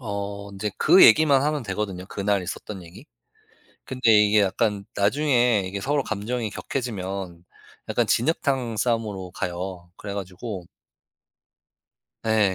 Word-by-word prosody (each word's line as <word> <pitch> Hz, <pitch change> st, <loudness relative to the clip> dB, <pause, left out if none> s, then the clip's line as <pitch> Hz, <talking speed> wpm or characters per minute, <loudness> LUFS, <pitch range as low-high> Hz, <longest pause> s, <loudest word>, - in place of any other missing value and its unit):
어 100 Hz, -2 st, -5 dB
인제 100 Hz, +2 st, -3 dB
그 190 Hz, -, +7 dB
얘기만 140 Hz, +2 st, +6 dB
하면 150 Hz, -1 st, 0 dB
되거든요 95 Hz, -3 st, -4 dB
그날 100 Hz, -1 st, -1 dB
있었던 95 Hz, +1 st, -7 dB
얘기. 95 Hz, -, -14 dB, 0.8 s
근데 130 Hz, -3 st, +1 dB
이게 105 Hz, -1 st, +5 dB
약간 100 Hz, +1 st, 0 dB
나중에 120 Hz, -1 st, +2 dB
이게 100 Hz, +2 st, -4 dB
서로 145 Hz, +6 st, 0 dB
감정이 110 Hz, +1 st, -3 dB
격해지면 95 Hz, -8 st, -5 dB, 0.4 s
약간 -, -, +1 dB
진흙탕 130 Hz, -3 st, 0 dB
싸움으로 105 Hz, -5 st, -1 dB
가요. 90 Hz, 0 st, -5 dB
그래 100 Hz, -1 st, -7 dB
가지고 95 Hz, 0 st, -6 dB, 1.6 s
네. 110 Hz, -4 st, +2 dB
105 Hz, 275 characters per minute, -24 LUFS, 95-120 Hz, 1.6 s, 그